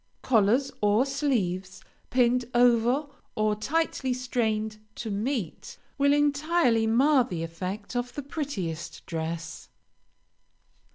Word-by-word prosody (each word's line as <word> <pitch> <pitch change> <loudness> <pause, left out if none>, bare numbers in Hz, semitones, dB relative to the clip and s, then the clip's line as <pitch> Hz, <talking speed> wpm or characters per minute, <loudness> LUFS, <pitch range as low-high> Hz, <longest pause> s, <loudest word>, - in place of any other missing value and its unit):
Collars 240 +3 +3
or 210 +4 +3
sleeves, 205 -10 -1 0.3
pinned 250 0 +3
over 245 +3 +4 0.3
or 215 -2 +2
tightly 270 +2 -1
strained 220 -4 -1 0.2
to 225 - -5
meet, 205 - -3 0.2
will 280 0 +4
entirely 290 -4 +2
mar 260 +4 +4
the 175 -8 -4
effect 185 +7 -5
of 245 0 -2
the 290 - -4
prettiest 205 - -5
dress. 165 0 -5
235 Hz, 105 wpm, -27 LUFS, 200-275 Hz, 0.3 s, over